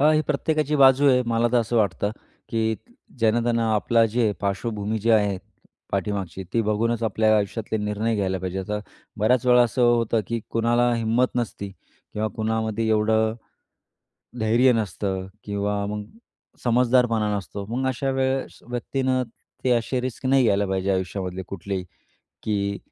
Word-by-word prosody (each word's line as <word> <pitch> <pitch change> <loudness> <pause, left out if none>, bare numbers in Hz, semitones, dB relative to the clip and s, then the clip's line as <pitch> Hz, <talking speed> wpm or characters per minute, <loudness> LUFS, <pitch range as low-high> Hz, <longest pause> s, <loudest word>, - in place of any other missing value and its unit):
अ, 150 +2 +6
ही 155 - +3
प्रत्येकाची 150 0 0
बाजू 135 0 +6
आहे. 125 -1 +4
मला 115 0 +2
तर 120 - +5
असं 115 +1 -2
वाटतं, 105 -1 +1 0.4
की 110 -1 0 0.4
ज्यानं 115 +1 +2
त्यानं 115 -1 +1
आपली 115 +3 +3
जी 115 -1 +1
पार्श्वभूमी 105 +2 -2
आहे 105 -3 +3 0.5
पाठीमागची, 95 -2 -2
ती 115 - +2
बघूनच 115 +2 0
आपल्या 110 0 +3
आयुष्यातले 105 +2 -2
निर्णय 105 +2 -1
घ्यायला 95 -2 -1
पाहिजे. 95 +1 -4
आता 105 +2 -3 0.4
बऱ्याच 125 +4 +2
वेळा 125 0 +6
असं 120 +2 0
होतं, 115 -2 +3
की 115 -1 -2
कुणाला 120 +1 +2
हिंमत 115 +3 +1
नसते 110 -4 -3 0.4
किंवा 110 +1 -1
कुणामध्ये 110 0 -1
एवढं 110 0 +2 1.1
धैर्य 120 +4 +4
नसतं 95 -3 -2 0.2
किंवा 100 0 -2
मग 105 0 -4 0.6
समजदारपणा 120 -3 +2
नसतो. 100 +1 -6
मग 130 +3 -1
अशा 135 +1 -1
वेळेस 130 0 -1
व्यक्तीनं 130 +1 -1 0.4
ते 125 - +2
असे 120 +2 +1
रिस्क 130 +1 -5
नाही 135 0 +4
घ्यायला 100 -2 +2
पाहिजे 95 0 0
आयुष्यामधले 95 0 -3
कुठलेही, 95 0 -4 0.6
की 100 -2 -1
110 Hz, 145 wpm, -24 LUFS, 105-120 Hz, 1.1 s, अ